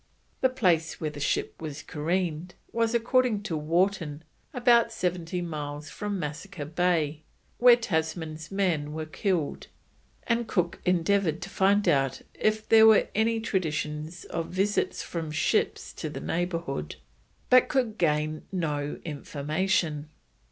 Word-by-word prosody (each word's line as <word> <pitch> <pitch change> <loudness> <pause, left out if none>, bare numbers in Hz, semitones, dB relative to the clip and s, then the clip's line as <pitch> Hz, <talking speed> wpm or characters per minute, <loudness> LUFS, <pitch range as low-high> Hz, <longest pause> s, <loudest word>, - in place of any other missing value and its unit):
The 260 - +4
place 180 -11 +1
where 155 -1 -2
the 145 - -9
ship 145 - -1
was 150 -2 -6
careened 170 +2 -2 0.2
was, 230 0 +1
according 235 -2 +2
to 180 -6 -3
Wharton, 165 0 0 0.3
about 240 -2 +4
70 180 -3 -2
miles 150 -2 -5
from 205 -1 -3
Massacre 155 +1 -5
Bay, 160 -2 0 0.4
where 245 0 +8
Tasman's 160 -6 -3
men 170 -7 0
were 160 0 -4
killed, 170 -1 -2 0.6
and 235 -1 0
Cook 175 -5 0
endeavoured 180 -1 +2
to 195 - -7
find 200 +2 +3
out 135 -2 +2
if 215 0 0
there 220 0 +8
were 220 -1 +5
any 225 +1 +2
traditions 155 -5 -3
of 165 - -3
visits 195 +3 0
from 165 -2 -4
ships 150 - 0
to - - -5
the - - -6
neighbourhood, 165 - -3 0.6
but 255 0 +6
could 245 -6 0
gain 155 -1 +1
no 150 -6 -2
information. 155 +1 -1
170 Hz, 130 wpm, -27 LUFS, 155-200 Hz, 0.6 s, where